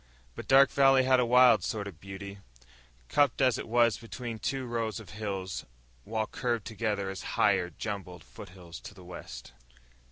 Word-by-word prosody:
But - - -9
Dark 135 0 +6
Valley 135 -1 +5
had 130 0 +4
a 125 - +2
wild 125 -5 +6
sort 105 -2 -3
of 85 -6 -10
beauty, 100 +1 -9 0.7
cupped 145 - +2
as 130 -3 +3
it - - -6
was 115 -1 +3
between 115 0 -7
two 135 +2 -2
rows 115 -2 -2
of 105 -6 -12
hills 95 -3 -4 0.4
which 110 -1 -3
curved 120 -4 -2
together 105 -3 -2
as 95 - -7 0.2
higher, 90 - +3
jumbled 90 -2 -6
foothills 85 -2 -11
to 105 - -11
the 95 - -13
west. 65 -8 -10
110 Hz, 165 wpm, -29 LUFS, 95-120 Hz, 0.7 s, Dark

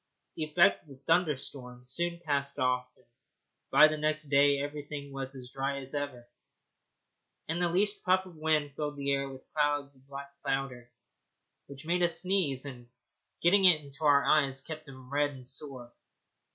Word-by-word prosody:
The 155 - -2
effect 155 +3 +4
of 155 - -24
the 135 0 -14
thunderstorm 135 -7 -1
soon 170 +6 -2
passed 140 -2 -1
off, 125 -2 +1
and 130 - -27 0.6
by 155 - +8
the 155 0 -3
next 155 -1 -1
day 140 0 +4
everything 145 0 -6
was 135 0 -5
as 125 -1 -9
dry 135 +1 -2
as 135 0 -5
ever, 145 -5 -4 1.2
and 165 +3 -2
the 175 - +2
least 205 +4 +2
puff 185 0 +3
of 180 -3 -13
wind 155 -2 0
filled 150 -1 -4
the 140 0 -1
air 140 0 0
with 130 -1 -11
clouds 145 -2 0
of 135 0 -26
black 140 0 -8
powder 130 -3 -3 0.8
which 140 +2 -11
made 175 +2 +1
us 175 -1 +2
sneeze, 175 -9 +1
and, 120 -3 -9 0.5
getting 195 +3 +5
into 155 -5 +3
our 145 -2 +5
eyes, 135 -3 +2
kept 155 +1 -8
them 130 0 -12
red 145 0 +2
and 130 -1 -10
sore. 130 -3 -6
140 Hz, 170 wpm, -30 LUFS, 135-155 Hz, 1.2 s, by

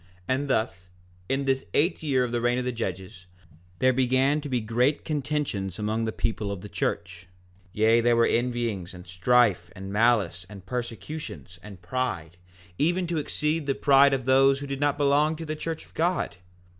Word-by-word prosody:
4:9 85 - -28 0.2
And 135 +2 0
thus, 100 -8 -1 0.4
in 135 +1 0
this 135 0 +1
eighth 165 +6 +2
year 135 -5 +1
of 125 - -3
the 120 0 -1
reign 120 +1 +2
of 125 - -2
the 125 - 0
judges, 95 -5 -6 0.5
there 130 +6 +3
began 130 +3 +2
to 145 - -6
be 125 -2 +1
great 120 +6 0
contentions 145 - -2
among 110 +1 -1
the 110 - -1
people 110 -2 -2
of 100 -3 -5
the 105 - -9
church; 90 0 -3 0.4
yea, 110 +3 +3
there 120 0 +3
were 115 0 +4
envyings, 115 -7 -1
and 90 0 -11
strife, 90 0 +2
and 95 +1 -7
malice, 105 -6 +2
and 100 -3 -11
persecutions, 115 - -6
and 100 -3 -12
pride, 90 -6 -3 0.4
even 175 +4 +1
to 165 -2 -1
exceed 150 +1 -1
the 135 - +1
pride 140 -1 +5
of 130 -2 -5
those 135 +1 +5
who 140 - -6
did 135 -1 -4
not 145 0 +1
belong 145 +2 +3
to 165 +1 -7
the 155 0 -3
church 160 +1 -5
of - - -24
God. 175 - -1
120 Hz, 190 wpm, -26 LUFS, 100-140 Hz, 0.5 s, pride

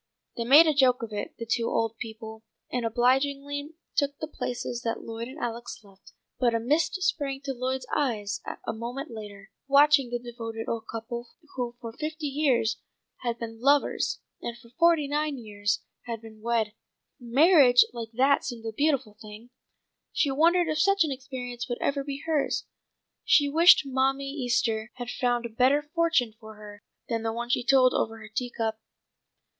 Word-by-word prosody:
_'" - - -51
They 235 - -3
made 290 +7 +8
a 310 - +3
joke 255 -3 +3
of 220 -2 -6
it, 205 - -5
the 230 - -5
two 230 0 0
old 225 0 0
people, 220 -1 -8 0.3
and 245 -2 -1
obligingly 280 +5 0 0.2
took 285 -1 0
the - - -4
places 245 -4 -4
that 230 -2 -3
Lloyd 230 +1 -6
and 265 +4 -10
Alex 240 -4 -5
left, 195 -1 -19 0.3
but 240 -2 +2
a - - +2
mist 305 +9 +1
sprang 285 -7 -1
to 275 -1 -3
Lloyd's 255 +1 -3
eyes 215 -7 -1 0.2
a - - -2
moment 245 +5 -6
later, 205 -2 -10 0.2
watching 280 -1 +5
the 240 - -1
devoted 230 -2 -7
old 230 -1 -3
couple 235 +1 -5 0.3
who 245 -2 -3
for 230 -1 -7
fifty 310 +3 -5
years 270 -6 +1 0.4
had 235 -2 -3
been 225 -1 -7
lovers 280 +2 +2 0.2
and 235 0 -5
for 235 -1 -18
forty 330 +1 +3
nine 295 0 -1
years 210 -2 -2 0.2
had 230 -1 -4
been 220 -1 -14
wed. 225 -2 0 0.5
Marriage 260 +1 +6
like 230 -2 -6
that 270 +4 +3
seemed 230 -3 -6
a 225 - -2
beautiful 275 -4 0
thing; 215 +2 -11 0.6
she 285 - +1
wondered 335 +5 +3
if 310 0 -1
such 395 +2 +4
an 310 - -2
experience 255 -2 -6
would 240 - -2
ever 280 0 0
be 280 0 -6
hers. 315 -3 0 0.6
She 290 - +4
wished 330 +5 +7
Mammy 270 +1 0
Easter 240 -5 0
had 245 -1 -5
found 245 -1 0
a - - -4
better 260 +6 +3
fortune 315 -7 +1
for 220 -1 -11
her 205 -1 -12 0.3
than 230 -2 -1
the 225 0 -1
one 235 +1 -4
she 245 - +1
told 260 0 +5
over 225 0 -1
her 215 -1 -11
tea 245 +4 -3
cup. 220 -2 -3
245 Hz, 180 wpm, -27 LUFS, 225-280 Hz, 0.6 s, made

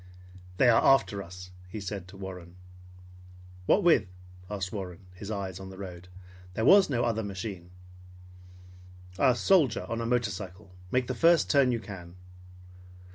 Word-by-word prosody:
"They 130 - +5
are 115 -2 +5
after 135 -7 +3
us!" 90 0 -10 0.2
he 110 - -6
said 100 -2 -6
to 95 +2 -13
Warren. 90 -2 -9 1.1
"What 200 - +4
with?" 170 - +4 0.4
asked 95 -2 -4
Warren, 95 -2 -7
his 100 +3 -9
eyes 95 -3 -4
on 95 0 -8
the 95 - -11
road. 90 -2 -9 0.5
"There 110 - 0
was 195 +3 +7
no 120 -3 0
other 115 -2 0
machine." 95 -3 -6 1.5
"A 130 -3 +4
soldier 145 - +3
on 115 0 -3
a 115 - -2
motorcycle. 105 -5 -3 0.2
Make 125 +4 +1
the 130 - -3
first 165 +5 +4
turn 140 -3 +4
you 120 - -1
can." 90 -5 -10
100 Hz, 150 wpm, -28 LUFS, 95-120 Hz, 1.5 s, was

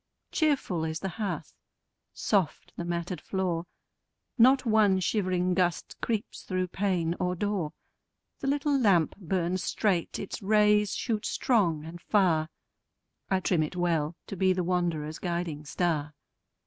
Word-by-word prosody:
Cheerful 275 - +1
is 160 0 -2
the 195 - -2
hearth, 205 - -3 0.6
soft 190 -8 0
the - - -4
matted 175 +1 -3
floor; 180 -3 -2 0.7
Not 260 +2 +5
one 215 -4 +4
shivering 185 -2 +1
gust 180 -2 0
creeps 225 +1 -2
through 185 -1 -2
pane 180 -4 0
or 180 0 0
door; 185 -5 -1 0.7
The 275 - -4
little 285 +1 +1
lamp 195 - +3
burns 185 -1 -1
straight, 190 -6 0
its 195 - -5
rays 210 0 +3
shoot 220 -4 -1
strong 170 - +1
and 170 +1 -9
far: 170 -6 +2 0.8
I 190 -1 +2
trim 180 -3 +2
it 155 +3 -2
well, 170 -3 0
to - - -6
be 185 0 +3
the 180 -1 -1
wanderer's 170 -3 -1
guiding 170 -4 -3
star. 150 -1 -1
180 Hz, 135 wpm, -28 LUFS, 170-205 Hz, 0.8 s, Not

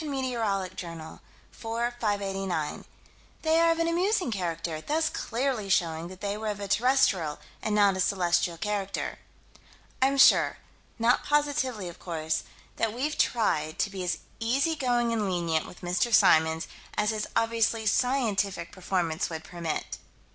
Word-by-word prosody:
Met. 275 -3 -2
Jour._, 185 -7 -3 0.3
4 230 +2 -2
589: 195 -6 -2 0.6
"They 320 0 +3
are 335 0 +5
of 330 - +2
an 330 0 +1
amusing 360 - +1
character, 165 -5 -3
thus 315 - 0
clearly 240 -7 -2
showing 170 -3 +1
that 185 +2 -11
they 200 0 -2
were 215 +1 -5
of 205 -1 -2
a 200 - -4
terrestrial 205 - +2 0.2
and 215 -1 -1
not 200 -2 +4
a - - -4
celestial 175 -3 +1
character." 200 +2 -3 0.8
I'm 270 +1 +3
sure 270 - +6 0.4
not 235 +1 +3
positively, 285 -8 0
of 170 - -9
course 160 -2 -2 0.4
that 225 -1 0
we've 285 +6 -2
tried 155 -10 +1
to 200 - 0
be 190 -2 -5
as 180 - -1 0.2
easygoing 245 -1 +1
and 210 -3 0
lenient 170 -3 0
with 180 - -13
Mr. 180 +6 0
Symons 160 -5 +4 0.3
as 210 +1 +2
his 215 -1 -3
obviously 225 -1 +1
scientific 205 -7 +1
performance 180 -3 -1
would 160 -1 -6
permit. 170 -3 -4
205 Hz, 145 wpm, -28 LUFS, 175-245 Hz, 0.8 s, sure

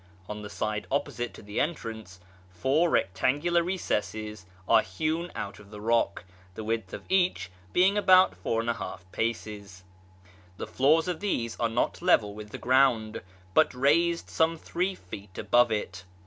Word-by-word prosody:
On 105 0 -6
the 105 - -7
side 105 0 -3
opposite 120 -4 -2
to - - -12
the 105 +1 -4
entrance, 110 - -4 0.3
four 135 - +1
rectangular 145 - +1
recesses 110 - -3 0.2
are - - +6
hewn 155 - -2
out 100 - -5
of 105 -1 -15
the 105 0 -10
rock, 115 -2 +1 0.3
the 110 - -6
width 110 -3 -2
of - - -7
each 180 - +1 0.2
being 195 +3 +4
about 185 -2 +6
4l 115 -3 -2
paces. 105 -4 -4 0.7
The - - -4
floors 155 +5 +3
of 175 -3 -2
these 120 - -2
are 115 - +1
not 115 +7 -1
level 115 - +3
with 105 0 -9
the - - -7
ground, 125 -4 +2 0.3
but - - +4
raised 165 +6 +2
some 165 +1 +2
three 180 +4 -2
feet 95 - -11
above 120 -1 +3
it. 95 -4 -3
115 Hz, 150 wpm, -28 LUFS, 105-165 Hz, 0.7 s, are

